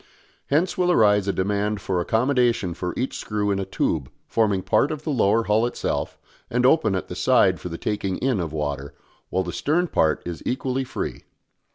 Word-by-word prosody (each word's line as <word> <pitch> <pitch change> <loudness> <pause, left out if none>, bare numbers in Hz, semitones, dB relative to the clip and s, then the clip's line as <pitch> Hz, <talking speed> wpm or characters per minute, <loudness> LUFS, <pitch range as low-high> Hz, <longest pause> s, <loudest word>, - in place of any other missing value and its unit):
Hence 170 +6 +1
will 180 -1 +3
arise 105 - +4
a - - +3
demand 100 +2 -1
for 95 -2 -1
accommodation 120 -3 +1
for 90 0 -3
each 130 - -2
screw 105 -1 -1
in 100 - 0
a 95 - -2
tube 75 -7 -1 0.2
forming 105 -5 +1
part 145 - +2
of 155 -1 -5
the 155 - -2
lower 115 -3 +3
hull 110 +1 +2
itself 120 - -3 0.3
and 125 +1 +1
open 120 -8 +4
at 95 - -3
the - - -6
side - - +3
for 90 - -6
the 85 - -5
taking 100 -2 -2
in 130 -5 0
of 85 -3 -3
water, 70 -2 -4 0.3
while 95 +1 0
the 85 - -5
stern 165 +5 +1
part 80 - +1
is 85 -2 -5
equally 130 +1 -1
free. 130 - -5
105 Hz, 195 wpm, -23 LUFS, 95-125 Hz, 0.3 s, arise